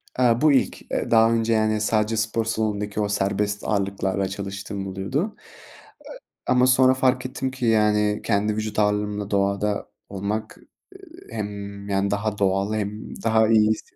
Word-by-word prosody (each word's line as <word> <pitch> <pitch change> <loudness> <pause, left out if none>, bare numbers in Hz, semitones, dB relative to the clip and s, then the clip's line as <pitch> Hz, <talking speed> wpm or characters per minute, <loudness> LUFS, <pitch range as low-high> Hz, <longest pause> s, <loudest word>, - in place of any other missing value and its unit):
Aaa, 120 -1 +3
bu 155 -1 +5
ilk, 135 - +1
eee, - - -2
daha 115 0 +5
önce, 115 0 +1
yani, 110 -1 +1
sadece 110 +1 +1
spor 110 +1 0
salonundaki 105 -2 -2
o 105 - -1
serbest 100 +1 -1
ağırlıklarla 100 -1 -1
çalıştığım 100 0 -5
oluyordu. 125 - -3 1.1
E - - +3
ama 125 0 +4
sonra 130 0 +5
fark 130 -1 +1
ettim 130 0 -3
ki, 130 -1 -4
yani, 105 -2 +2
kendi 105 0 +1
vücut 110 0 -3
ağırlığımla 105 0 0
doğada 100 +1 0 0.2
olmak, 105 +3 -4
ııı, 375 - -18
hem, 100 -2 -6
yani, 100 0 0
daha 105 +1 -1
doğal 100 +2 +1
hem 105 0 -4
daha 110 -1 +3
iyi 110 -1 +5
hisse 110 - -5
105 Hz, 155 wpm, -23 LUFS, 100-115 Hz, 1.1 s, bu